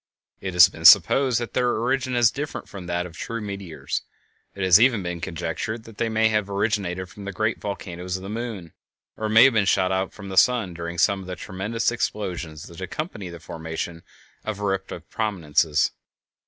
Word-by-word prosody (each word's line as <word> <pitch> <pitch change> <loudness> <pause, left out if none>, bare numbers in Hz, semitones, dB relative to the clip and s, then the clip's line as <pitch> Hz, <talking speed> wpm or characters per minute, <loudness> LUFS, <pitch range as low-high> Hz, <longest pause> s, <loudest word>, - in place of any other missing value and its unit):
It 95 -1 -4
has 90 -2 +9
been - - -11
supposed 130 -4 +7
that 120 - -5
their 125 -1 +1
origin 130 +2 0
is 120 -2 +5
different 145 +2 -5
from 95 -3 -9
that 85 0 -1
of 90 - -8
the - - -14
true 115 0 -4
meteors; 100 -5 -4 0.5
it 100 - -3
has 95 +1 +7
even 115 -5 +4
been 90 -1 -4
conjectured 95 +6 -4
that 115 -2 -14
they 115 -1 +1
may 110 0 +3
have 105 -2 0
originated 100 -3 -1
from 100 +2 -11
the 100 - -4
giant 110 +3 -1
volcanoes 90 -2 -4
of 95 - -10
the - - -6
moon 105 -6 -5 0.4
or 110 0 -3
have 115 +4 +7
been 110 -3 +3
shot 95 -1 +3
out 95 0 0
from 100 -2 -10
the 95 - -5
sun 115 -7 +4
during 85 0 -6
some 95 +4 +3
of 95 - -10
the 90 - -4
tremendous 105 +6 -2
explosions 90 -9 -3
that 85 +2 -11
accompany 105 - -5
the 85 -1 -9
formation 80 +2 -6 0.4
of 110 -2 -4
eruptive 95 -4 -3
prominences. 80 -7 +1
100 Hz, 195 wpm, -24 LUFS, 90-110 Hz, 0.5 s, has